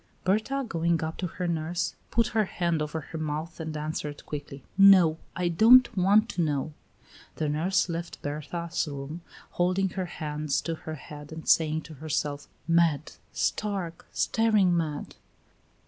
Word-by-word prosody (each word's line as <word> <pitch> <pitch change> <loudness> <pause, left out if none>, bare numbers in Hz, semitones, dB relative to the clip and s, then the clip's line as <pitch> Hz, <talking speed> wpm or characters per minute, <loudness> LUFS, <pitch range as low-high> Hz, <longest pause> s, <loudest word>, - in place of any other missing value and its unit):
Berta, 220 +8 0
going 170 -2 0
up 160 +1 -4
to 180 - -2
her 180 +1 -4
nurse, 170 +1 -1 0.2
put 230 -1 +2
her 220 -1 +2
hand 170 -4 -1
over 150 +1 -3
her 160 +2 -7
mouth 155 +2 -4
and 160 -1 -4
answered 150 -1 -4
quickly: 145 -2 -7
"No, 185 -5 +7 0.2
I 180 0 0
don't 230 +9 +6
want 200 +4 +4
to 180 - -1
know." 150 -1 -1 0.6
The 155 - -1
nurse 170 +7 +1
left 170 0 -5
Berta's 155 +4 -3
room, 145 +3 -6 0.3
holding 185 +2 +1
her 185 0 -3
hands 150 -3 -2
to 165 - -3
her 160 -1 -6
head 150 0 -10
and 160 0 -8
saying 160 -1 +3
to 160 - -11
herself: 145 -1 -3 0.2
"Mad, 165 -3 +2 0.2
stark, 195 -6 -2
staring 215 -6 +3
mad!" 155 -3 -3
165 Hz, 150 wpm, -27 LUFS, 155-185 Hz, 0.6 s, No